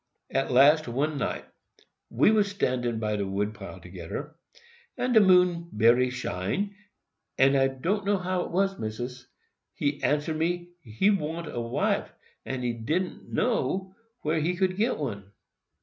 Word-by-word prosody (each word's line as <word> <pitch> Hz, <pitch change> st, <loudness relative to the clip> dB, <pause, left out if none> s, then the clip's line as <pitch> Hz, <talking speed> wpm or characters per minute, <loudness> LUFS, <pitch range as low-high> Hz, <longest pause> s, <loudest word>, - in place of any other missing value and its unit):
"At 135 Hz, -, 0 dB
last, 145 Hz, +4 st, +6 dB
one 140 Hz, +5 st, -1 dB
night, -, -, -2 dB, 0.6 s
we -, -, +4 dB
was 210 Hz, -2 st, +3 dB
standin' 125 Hz, -, -1 dB
by 105 Hz, -1 st, -1 dB
de 100 Hz, -1 st, -2 dB
wood 100 Hz, +2 st, -1 dB
pile 100 Hz, -3 st, -9 dB
togeder, 90 Hz, -, -7 dB, 0.6 s
and 250 Hz, 0 st, 0 dB
de 220 Hz, -, +8 dB
moon 180 Hz, -3 st, +4 dB
bery 120 Hz, +4 st, +4 dB
shine, 125 Hz, -, -3 dB, 0.6 s
and 135 Hz, +1 st, +5 dB
I 135 Hz, 0 st, +4 dB
do'no 195 Hz, +10 st, 0 dB
how 185 Hz, -1 st, -1 dB
't -, -, -11 dB
was, 195 Hz, +2 st, +1 dB
Missis, 120 Hz, +3 st, -5 dB, 0.5 s
he 145 Hz, 0 st, -1 dB
answer 150 Hz, +2 st, +1 dB
me, 175 Hz, +2 st, -1 dB
he 140 Hz, -, +1 dB
wan't 165 Hz, -3 st, -2 dB
a 120 Hz, -, -2 dB
wife, 115 Hz, 0 st, -1 dB, 0.3 s
but 130 Hz, -1 st, -4 dB
he 120 Hz, -1 st, 0 dB
didn't 155 Hz, +11 st, -3 dB
know 190 Hz, -5 st, 0 dB, 0.3 s
where 155 Hz, +1 st, +1 dB
he 165 Hz, +4 st, 0 dB
get 190 Hz, +6 st, +1 dB
one. 100 Hz, -9 st, -5 dB
150 Hz, 150 wpm, -27 LUFS, 120-185 Hz, 0.6 s, de